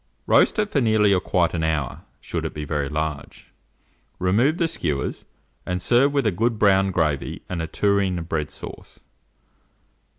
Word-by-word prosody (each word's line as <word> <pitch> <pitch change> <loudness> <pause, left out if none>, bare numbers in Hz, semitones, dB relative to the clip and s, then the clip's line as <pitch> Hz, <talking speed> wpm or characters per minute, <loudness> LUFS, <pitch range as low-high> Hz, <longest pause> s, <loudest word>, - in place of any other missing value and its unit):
Roast - - +4
it 210 -1 0
for 140 - +2
nearly 110 -3 +3
or 95 - +3
quite 90 -2 +1
an 80 -2 -1
hour, 75 -5 -1 0.2
should - - -4
it - - -5
be 75 0 -4
very 75 -2 -2
large; 75 -1 -5 0.7
remove 115 - +2
the 170 - +1
skewers, 75 - -3 0.4
and 90 0 -2
serve 120 +9 +3
with 140 -3 0
a 110 - +3
good 115 +5 0
brown 95 -2 +4
gravy 80 -6 -1
and 90 -2 -3
a 80 - -3
tureen 100 0 +1
of 85 -1 -6
bread 75 -3 -2
sauce. - - -10
90 Hz, 170 wpm, -23 LUFS, 80-110 Hz, 0.7 s, Roast